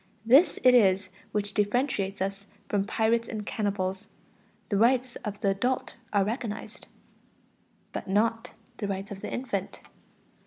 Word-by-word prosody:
This 270 +10 +6
it 255 0 +7
is 195 -5 +4 0.2
which 205 -1 -2
differentiates 205 -3 0
us 195 +1 -5 0.2
from 200 -1 0
pirates 230 +2 +1
and 215 -2 -5
cannibals. 200 -2 -2 0.6
The 200 - +1
rights 245 +3 +3
of 205 -2 -6
the 200 - +2
adult 250 +7 -1 0.2
are 200 -2 +3
recognized. 220 0 -5 1.1
But - - -5
not 225 +4 0 0.2
the 205 - -3
rights 195 +1 -4
of 195 -1 -7
the - - -5
infant. 200 -7 -3
210 Hz, 140 wpm, -28 LUFS, 195-230 Hz, 1.1 s, it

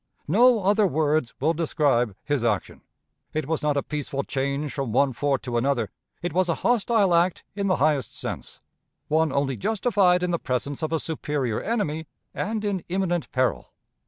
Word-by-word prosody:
No 225 - +5
other 205 +2 +4
words 155 -5 0
will 155 +5 +2
describe 145 - +1
his 145 -5 -1
action. 110 -5 -1 0.5
It 155 -2 -1
was 160 0 -1
not 150 -1 +1
a 140 - +1
peaceful 145 -2 -3
change 140 +2 -2
from 135 -5 -3
one 135 +3 +3
fort 140 +1 0
to 120 -2 -2
another; 120 -4 0 0.3
it 175 - -2
was 185 0 +2
a 165 - +2
hostile 225 -5 +3
act 170 +1 +2
in 200 0 -2
the 185 - +3
highest 150 -4 +1
sense - - -6 0.5
one 160 0 +2
only 140 -1 0
justified 190 - +2
in 180 - 0
the 170 - 0
presence 130 +2 -2
of 155 0 -2
a 165 - +2
superior 145 -8 -2
enemy 160 -9 -2 0.3
and 215 0 -2
in 195 -4 -1
imminent 175 -2 -1
peril. 130 -1 0
155 Hz, 175 wpm, -25 LUFS, 140-185 Hz, 0.5 s, No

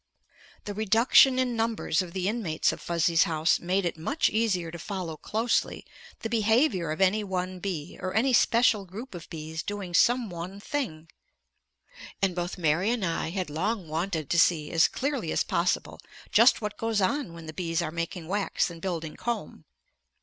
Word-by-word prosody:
The 205 - -4
reduction 225 +5 +5
in 255 -2 0
numbers 225 -6 0
of 180 -2 -6
the 185 -1 -1
inmates 205 -8 0
of - - -8
Fuzzy's 170 -1 +2
house 160 0 +2
made 185 +2 0
it 170 -2 -3
much 280 - +1
easier 195 -7 0
to 170 - -8
follow 180 -3 -5
closely 220 +9 -1 0.4
the - - -2
behavior 220 - +2
of 155 - -3
any 200 +3 +3
one 185 -1 -3
bee, 175 -5 -5
or 185 0 -2
any 255 +4 +3
special 230 -2 +4
group 215 +8 -9
of 175 -2 -9
bees 160 0 -5
doing 195 -1 -5
some 240 +3 +3
one 175 +3 -7
thing. 205 - -4 1.1
And 195 -2 +1
both 175 0 -3
Mary 170 +4 +1
and 235 -5 0
I 165 -1 -1
had 180 -3 -3
long 190 +4 -2
wanted 160 -1 -3
to 170 - +3
see 160 -4 +3
as 165 -1 +5
clearly 280 +2 -2
as - - +1
possible - - -1 0.3
just - - +6
what 210 0 -4
goes 225 -2 0
on 220 - 0
when 165 -1 -10
the 155 - -7
bees 165 -1 -2
are 155 - -3
making 170 0 -4
wax 195 -1 0
and 165 -1 -11
building 165 -4 -4
comb. 235 -1 -4
185 Hz, 180 wpm, -27 LUFS, 165-220 Hz, 1.1 s, just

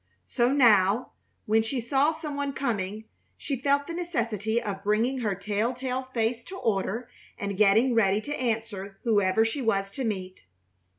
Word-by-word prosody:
So 240 - +1
now, 225 -5 +4 0.3
when 220 +1 +3
she 235 +4 -2
saw 270 +6 +2
some 310 -2 -6
one 285 -1 -2
coming, 215 -6 -2 0.3
she 270 -4 -4
felt 280 +1 +2
the 335 - -6
necessity 230 - -1
of 200 -3 -5
bringing 225 +6 +1
her 210 -5 -1
telltale 245 +6 -2
face 230 0 -1
to 380 - -8
order 225 - -1 0.3
and 200 -1 -3
getting 215 +5 +4
ready 205 -3 +3
to 290 +5 -4
answer 220 -6 -3
whoever 210 -2 +3
she 225 +5 -2
was 195 -4 0
to 265 - -4
meet. 185 - -4
225 Hz, 160 wpm, -27 LUFS, 205-260 Hz, 0.3 s, now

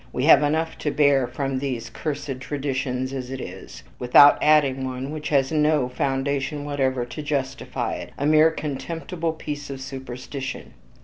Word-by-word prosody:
We 125 - -2
have 145 -2 +7
enough 160 +2 0
to 150 - -1
bear 140 -3 +3
from 135 -1 -2
these 120 -4 -4
cursed 140 -1 -4
traditions 130 -2 -3
as 130 -2 -5
it 135 0 -5
is, - - -9 0.2
without 135 +4 +7
adding 140 -3 +4
one 130 +1 -4
which 155 -1 -5
has 135 -1 +2
no 150 -4 +2
foundation 140 +2 -1
whatever 130 -4 0
to 120 +5 -7
justify 140 -2 -2
it - - -8
a 140 - -2
mere 155 +1 +6
contemptible 160 +3 -4
piece 145 -2 -6
of 135 -1 -6
superstition." 130 0 -7
140 Hz, 160 wpm, -24 LUFS, 130-150 Hz, 0.2 s, have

